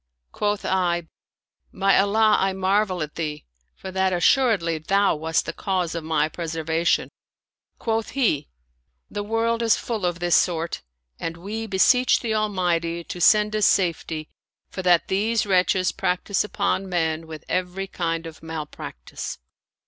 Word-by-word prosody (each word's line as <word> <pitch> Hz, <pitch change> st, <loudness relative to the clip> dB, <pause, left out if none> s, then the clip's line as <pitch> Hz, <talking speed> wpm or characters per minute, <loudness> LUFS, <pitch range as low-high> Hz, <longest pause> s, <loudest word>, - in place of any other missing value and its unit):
Quoth 205 Hz, -1 st, -1 dB
I, 175 Hz, -3 st, 0 dB, 0.3 s
" -, -, -69 dB, 0.3 s
By 195 Hz, +1 st, +3 dB
Allah, 210 Hz, +2 st, +4 dB
I 195 Hz, 0 st, +1 dB
marvel 190 Hz, -2 st, +1 dB
at 150 Hz, -, -7 dB
thee, 150 Hz, -2 st, -4 dB, 0.3 s
for 190 Hz, -, -8 dB
that 190 Hz, 0 st, +1 dB
assuredly 180 Hz, -, +2 dB
thou 195 Hz, +4 st, +2 dB
wast 160 Hz, +1 st, 0 dB
the 165 Hz, -, -4 dB
cause 185 Hz, -3 st, -1 dB
of 165 Hz, -2 st, -4 dB
my 155 Hz, -1 st, +1 dB
preservation! 165 Hz, 0 st, -1 dB, 0.3 s
" -, -, -60 dB
Quoth 225 Hz, -1 st, -1 dB
he, 155 Hz, -, +1 dB, 0.3 s
" 60 Hz, 0 st, -46 dB
The 205 Hz, -, -3 dB
world 225 Hz, +2 st, 0 dB
is 230 Hz, -1 st, +4 dB
full 225 Hz, -5 st, -4 dB
of 175 Hz, -1 st, -2 dB
this 175 Hz, 0 st, +2 dB
sort; 170 Hz, -2 st, +1 dB, 0.4 s
and 165 Hz, 0 st, -4 dB
we 215 Hz, +5 st, -5 dB
beseech 250 Hz, +6 st, +4 dB
the 225 Hz, -3 st, -1 dB
Almighty 175 Hz, -5 st, 0 dB
to 175 Hz, -, -7 dB
send 210 Hz, +3 st, +5 dB
us 215 Hz, -2 st, +4 dB
safety, 165 Hz, -4 st, 0 dB, 0.4 s
for 185 Hz, -, -4 dB
that 180 Hz, -2 st, +3 dB
these 215 Hz, +4 st, +1 dB
wretches 185 Hz, -1 st, +2 dB
practice 180 Hz, +2 st, 0 dB
upon 200 Hz, -2 st, -1 dB
men 160 Hz, -2 st, -1 dB
with 155 Hz, -1 st, -9 dB
every 185 Hz, +1 st, -2 dB
kind 165 Hz, -3 st, -3 dB
of 160 Hz, -1 st, -10 dB
malpractice." 155 Hz, -, -7 dB
185 Hz, 155 wpm, -24 LUFS, 165-205 Hz, 0.4 s, send